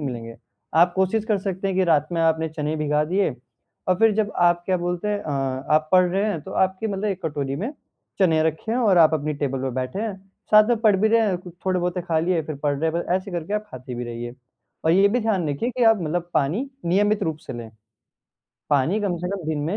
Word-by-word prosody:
ही 145 - -3
मिलेंगे। 115 -2 -6 0.4
आप 175 +1 +5
कोशिश 190 +3 +1
कर 215 -3 +1
सकते 190 0 -3
हैं 190 - -2
कि 190 - +3
रात 155 -3 +2
में 165 - 0
आपने 160 0 +2
चने 150 0 -3
भिगा 150 0 +1
दिए 190 +2 +1 0.6
और 185 - +4
फिर 225 -1 +5
जब 210 -1 0
आप 175 0 +3
क्या 185 -1 +2
बोलते 175 +3 -2
हैं 205 -1 0
अ, 155 - -5 0.4
आप 155 0 +2
पढ़ 185 0 +6
रहे 195 +3 +1
हैं 205 -8 -1
तो 190 - -10
आपकी 190 +4 -3
मतलब 200 0 -3
एक 190 -3 -2
कटोरी 140 -2 -3
में 220 - -3 0.5
चने 160 -5 +3
रखे 160 +8 -1
हैं 245 - +1
और 200 -7 +4
आप 160 -1 +6
अपनी 150 0 -2
टेबल 135 -2 -2
पे 135 - -1
बैठे 130 +9 -3
हैं। 210 -4 -3 0.3
साथ 215 +1 +7
में 240 - +3
पढ़ 215 -4 +4
भी 215 +3 +2
रहे 230 +1 +4
हैं, 200 -5 +1 0.3
थोड़े-बहुते 180 -1 0
खा 165 -2 0
लिए 170 0 +1
फिर 155 -1 -6
पढ़ 145 -1 +1
रहे 160 +1 +1
हैं, - - -10
बस - - -3
ऐसे 190 +1 -6
करके 175 +2 -4
आप 210 0 -2
खाती 125 0 -8
भी 120 0 -4
रहिए 120 +1 -6 0.5
और 160 - +4
ये 195 +2 +5
भी 245 +4 +1
ध्यान 195 -8 0
रखिए 185 - -1
कि 245 -1 0
आप 225 -2 +5
मतलब 175 +2 -2
पानी 180 - 0 0.2
नियमित 205 +3 +2
रूप 160 -4 -1
से - - -5
लें। 115 -2 -8 1.0
पानी 145 +9 +2
कम 195 -4 -1
से 180 +1 -4
कम 190 -5 -5
दिन 155 -2 -1
में 185 +7 -1
175 Hz, 245 wpm, -23 LUFS, 155-200 Hz, 1.0 s, साथ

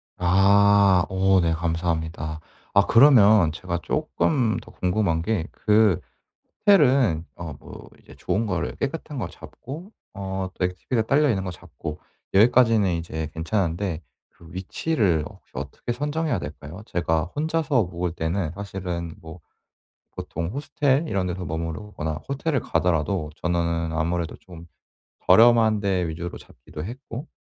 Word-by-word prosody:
아. 100 +1 +4
어 95 0 +3
네 85 -1 +1
감사합니다. 80 -1 -2 0.3
아 100 0 +5
그러면 110 - +6
제가 85 +2 -4
쪼끔 145 -6 0
더 - - -10
궁금한 90 -3 0
게 90 -1 -1
그 105 -4 +3 0.7
호텔은 130 - +4
어 85 -2 -6
뭐 - - -12
이제 - - -16
좋은 110 +3 -1
거를 100 -3 -2
깨끗한 150 0 -4
걸 - - -3
잡고 165 - -10 0.2
어 95 -1 -4
액티비티가 90 +6 -1
딸려 145 +6 +3
있는 95 -6 0
거 90 - -3
잡고 75 -2 -8 0.3
여기까지는 110 -2 +5
이제 80 -2 -4
괜찮은데 85 0 -1 0.3
그 85 - -18
위치를 95 - 0
혹시 - - -19
어떻게 120 - -5
선정해야 150 +2 -1
될까요? 75 +4 -8
제가 80 -2 0
혼자서 155 -5 +1
묵을 90 -1 -3
때는 85 0 -2
사실은 90 -4 -5
뭐 80 +2 -11 0.8
보통 85 0 -4
호스텔 140 - 0
이런 95 -8 -1
데서 90 0 -4
머무르거나 80 0 -4
호텔을 140 +1 -1
가더라도 85 -1 0
저는 85 -1 -1
아무래도 85 +1 -1
좀 85 -2 -13 0.6
저렴한 110 +2 +6
데 95 -3 0
위주로 85 +2 -5
잡기도 75 +5 -10
했고 125 - -7
95 Hz, 290 characters per minute, -24 LUFS, 85-115 Hz, 0.8 s, 그러면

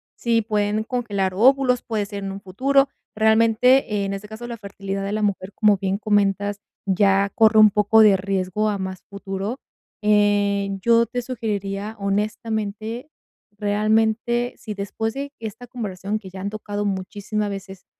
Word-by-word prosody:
si 230 -1 +1
pueden 210 0 0
congelar 205 -6 -2
óvulos, 250 +3 +4
puede 215 -3 -2
ser 200 0 -7
en 195 - -4
un 195 - -6
futuro. 270 +9 +2 0.3
Realmente, 220 0 +3
en 195 - -3
ese 195 +1 -6
caso, 220 +2 -8
la 235 -1 -6
fertilidad 195 -1 -5
de 200 - -3
la 215 +1 -1
mujer, 200 -2 -1
como 210 -2 +4
bien 190 0 -1
comentas, 205 -1 +1 0.3
ya 195 +1 +3
corre 220 0 +5
un 215 0 +9
poco 210 +2 +3
de 210 -2 +7
riesgo 195 +2 -1
a 205 - -1
más 190 -1 -5
futuro. 200 +4 -5 0.4
Eh, 205 -1 +2
yo 235 +2 +4
te 245 +2 -4
sugeriría, 210 -4 -4
honestamente, 215 +4 -3 0.4
realmente, 220 +3 +1
si 215 - -6
después 210 +2 -3
de 280 +1 -5
esta 225 +2 -7
conversación 210 -4 -4
que 190 - -11
ya 190 +1 -9
han 200 - -2
tocado 205 -1 -4
muchísima 205 +2 -3
veces, 195 -2 -8
210 Hz, 155 wpm, -22 LUFS, 200-225 Hz, 0.4 s, un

